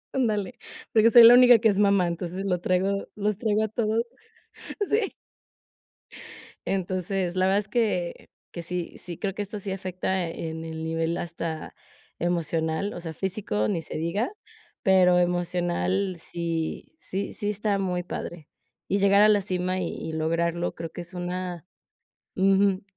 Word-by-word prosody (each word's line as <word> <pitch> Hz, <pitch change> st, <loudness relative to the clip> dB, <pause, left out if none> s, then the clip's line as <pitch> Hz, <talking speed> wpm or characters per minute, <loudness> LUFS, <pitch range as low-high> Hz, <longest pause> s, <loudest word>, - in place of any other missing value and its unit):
Ándale, 230 Hz, -2 st, -1 dB, 0.3 s
porque 225 Hz, 0 st, +5 dB
soy 235 Hz, +1 st, +9 dB
la 230 Hz, +1 st, +10 dB
única 245 Hz, -1 st, +8 dB
que 225 Hz, 0 st, +3 dB
es 200 Hz, -1 st, +1 dB
mamá. 200 Hz, -3 st, +4 dB
Entonces 175 Hz, +3 st, -4 dB
lo 180 Hz, -2 st, 0 dB
traigo 190 Hz, +2 st, 0 dB
los 210 Hz, -1 st, -1 dB
traigo 215 Hz, -2 st, +1 dB
a -, -, +1 dB
todos 220 Hz, +1 st, 0 dB, 0.8 s
sí. 425 Hz, -1 st, 0 dB, 1.5 s
Entonces, 185 Hz, -1 st, -1 dB
la 185 Hz, 0 st, +2 dB
verdad 195 Hz, +1 st, +3 dB
es 205 Hz, -, -6 dB
que 205 Hz, -6 st, -1 dB, 0.2 s
que 170 Hz, -, -6 dB
sí, 175 Hz, 0 st, -5 dB
sí, 175 Hz, -2 st, -8 dB
creo 195 Hz, -2 st, -2 dB
que 205 Hz, -, -4 dB
esto 205 Hz, +1 st, -5 dB
sí 200 Hz, -1 st, -5 dB
afecta 185 Hz, -1 st, -2 dB
en 160 Hz, -1 st, -5 dB
el 160 Hz, 0 st, -6 dB
nivel 165 Hz, +1 st, -1 dB
hasta 165 Hz, -2 st, -5 dB, 0.5 s
emocional, 165 Hz, +2 st, -1 dB
o -, -, -6 dB
sea, 165 Hz, -1 st, -6 dB
físico, 185 Hz, -, -1 dB
ni 165 Hz, -, -1 dB
se -, -, -8 dB
diga, 170 Hz, -, -1 dB, 0.5 s
pero 185 Hz, -2 st, +5 dB
emocional, 175 Hz, +1 st, 0 dB
sí 165 Hz, -2 st, -4 dB
sí 200 Hz, -, -4 dB
sí 205 Hz, -2 st, -3 dB
está 210 Hz, -1 st, 0 dB
muy 180 Hz, -2 st, -1 dB
padre, 170 Hz, -3 st, -6 dB, 0.4 s
y 200 Hz, -, +1 dB
llegar 200 Hz, +1 st, +5 dB
a -, -, +7 dB
la 205 Hz, -1 st, +4 dB
cima 185 Hz, -1 st, -1 dB
y 180 Hz, -, -1 dB
y 160 Hz, -, -6 dB
lograrlo, 170 Hz, +2 st, -1 dB
creo 165 Hz, -1 st, -6 dB
que 175 Hz, -, -7 dB
es 175 Hz, +2 st, -12 dB
una 180 Hz, -1 st, -4 dB, 0.7 s
Ujú. 195 Hz, 0 st, +3 dB
185 Hz, 160 wpm, -26 LUFS, 170-200 Hz, 1.5 s, la